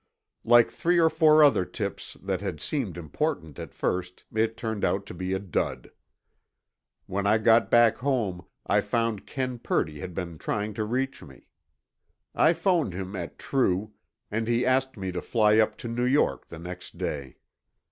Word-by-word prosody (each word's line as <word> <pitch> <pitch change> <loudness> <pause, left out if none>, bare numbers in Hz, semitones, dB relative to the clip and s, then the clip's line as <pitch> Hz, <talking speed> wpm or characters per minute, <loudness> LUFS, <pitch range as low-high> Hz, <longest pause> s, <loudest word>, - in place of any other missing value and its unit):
Like 120 0 +5
three 175 +1 +1
or 160 -1 +4
four 155 -1 +6
other 140 -10 +5
tips - - -5
that 95 -1 -2
had 95 -6 -4
seemed 105 - -3
important 85 - -3
at - - -7
first, 90 0 -3
it 110 +1 0
turned 110 -3 -3
out 100 +1 +1
to - - -9
be 90 +2 -4
a - - +1
dud. 95 -5 -3 1.1
When 100 +1 -2
I 110 - +5
got 115 +1 +4
back 120 -1 +5
home, 115 -10 -1 0.2
I - - +3
found 115 -4 -1
Ken 130 -2 -3
Purdy 75 -8 -1
had 90 +2 -7
been 85 -4 -5
trying 105 +1 -2
to 110 0 -2
reach 130 +4 -2
me. 65 -3 -14 0.9
I 160 - +4
phoned 170 - +1
him 95 +1 -5
at 85 -3 -6
True, 105 -5 0 0.4
and 110 +1 -1
he 120 +1 +1
asked 130 0 +1
me 95 -2 -3
to 90 -1 -4
fly 110 -2 +3
up 110 - +2
to - - -7
New 120 +1 -1
York 135 +4 +1
the 85 - -9
next 90 +2 -9
day. 70 -3 -4
110 Hz, 175 wpm, -27 LUFS, 90-125 Hz, 1.1 s, four